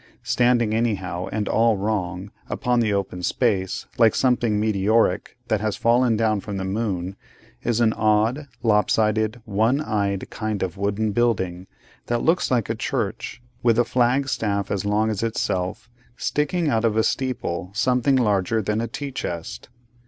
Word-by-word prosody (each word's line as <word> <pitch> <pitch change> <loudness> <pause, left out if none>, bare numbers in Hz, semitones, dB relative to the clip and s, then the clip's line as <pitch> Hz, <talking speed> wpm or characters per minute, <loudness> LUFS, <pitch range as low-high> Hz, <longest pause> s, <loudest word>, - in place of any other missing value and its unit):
Standing 120 -3 +2
anyhow 95 -6 -1
and 105 -1 -2
all 115 -2 +3
wrong, 95 -2 -2 0.2
upon 125 -3 0
this 110 -3 +1
open 95 -2 -2
space, 95 -1 0
like 115 -2 +5
something 120 -5 +2
meteoric 105 0 +1
that 110 -2 0
has 110 -1 -1
fallen 120 -1 +3
down 110 -2 +1
from 100 0 -5
the 95 - -3
moon, 95 -2 -2 0.5
is 120 -1 0
an 110 -2 +3
odd, 110 +6 +1 0.2
lop 105 -4 +3
sided, 110 +1 +1
one 110 +5 +1
eyed 100 -8 -1
kind 110 -3 -2
of 90 -2 -3
wooden 100 +2 -1
building, 95 -6 0 0.4
that 120 0 0
looks 170 +3 +2
like 120 -4 +1
a 115 - -1
church, 115 +1 -3 0.2
with 115 -2 +3
a 120 - +4
flag 125 +3 +2
staff 100 -6 -1
as 100 -1 -1
long 105 +2 +1
as 105 - -3
itself 95 -4 -2 0.3
sticking 155 +3 0
out 115 -5 +1
of 110 -1 +1
a 110 - +4
steeple 115 -11 -2
something 125 +4 +2
larger 105 -3 +2
than 105 +1 -1
a 115 - -2
tea 140 +5 -5
chest. 85 - -5
110 Hz, 160 wpm, -23 LUFS, 100-120 Hz, 0.5 s, like